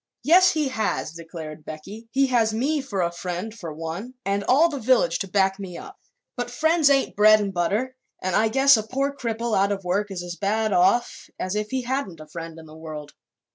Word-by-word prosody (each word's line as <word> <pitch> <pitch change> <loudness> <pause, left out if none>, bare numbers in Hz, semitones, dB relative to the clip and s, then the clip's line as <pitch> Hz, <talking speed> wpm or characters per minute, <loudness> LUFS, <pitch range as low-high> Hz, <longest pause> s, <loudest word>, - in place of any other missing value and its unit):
"Yes, 365 +4 +6
he 305 -4 0
has!" 220 -9 -2
declared 160 -2 -9
Becky. 195 +10 -9
"He 275 +2 +3
has 230 -4 +2
me 285 +6 0
for 205 -9 -2
a 170 - 0
friend, 180 +4 -5
for 185 -8 -7
one, 165 +11 -6
and 200 +1 0
all 290 +7 +5
the 290 -4 -5
village 220 -9 +2
to 195 - -3
back 195 0 +1
me 180 -3 -7
up. 400 0 -11 0.4
But 245 -1 -3
friends 315 +4 +3
ain't 275 -1 +2
bread 215 +1 +7
an' 200 -2 -2
butter 205 +9 -1 0.2
and 185 -1 -2
I 220 - +4
guess 270 +4 +5
a - - 0
poor 275 +6 -2
cripple 235 -3 -2
out 200 +1 +2
of 195 -1 -3
work 200 +4 -1
is 185 -3 -5
as 175 0 -6
bad 215 +1 0
off 195 +7 +2
as 185 +2 -2
if 210 0 -2
he 260 -1 -2
hadn't 245 - -3
a 155 - -10
friend 165 +1 -8
in 160 - -11
the 155 0 -13
world. 155 -2 -8
210 Hz, 215 wpm, -24 LUFS, 175-255 Hz, 0.4 s, bread